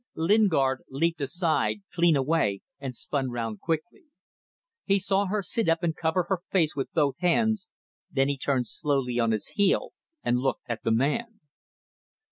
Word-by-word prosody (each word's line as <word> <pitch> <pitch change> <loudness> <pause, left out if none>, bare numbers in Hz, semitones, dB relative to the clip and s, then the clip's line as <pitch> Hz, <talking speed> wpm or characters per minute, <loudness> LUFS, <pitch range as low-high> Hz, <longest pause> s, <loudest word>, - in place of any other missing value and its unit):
Lingard 160 -8 +3
leaped 165 +4 0
aside, 165 +7 0
clean 170 -2 +4
away, 135 -8 +1 0.2
and 135 -3 -5
spun 135 +1 -2
round 115 -3 -4
quickly. 165 - -3 0.8
He 195 -1 +3
saw 195 +1 +1
her 205 +1 -1
sit 220 0 0
up 165 +2 +1
and 165 -2 0
cover 165 +2 +1
her 190 -1 -1
face 165 -5 +2
with 135 - -3
both 140 -4 +1
hands, 210 +3 +1 0.4
then 135 -1 +1
he 140 - 0
turned 130 -2 0
slowly 135 -3 0
on 115 -1 +2
his 110 -2 -1
heel 200 -2 +1 0.3
and 120 +1 +2
looked 135 +1 -1
at 115 -1 -3
the - - +1
man. 210 - 0
160 Hz, 160 wpm, -27 LUFS, 130-185 Hz, 0.8 s, clean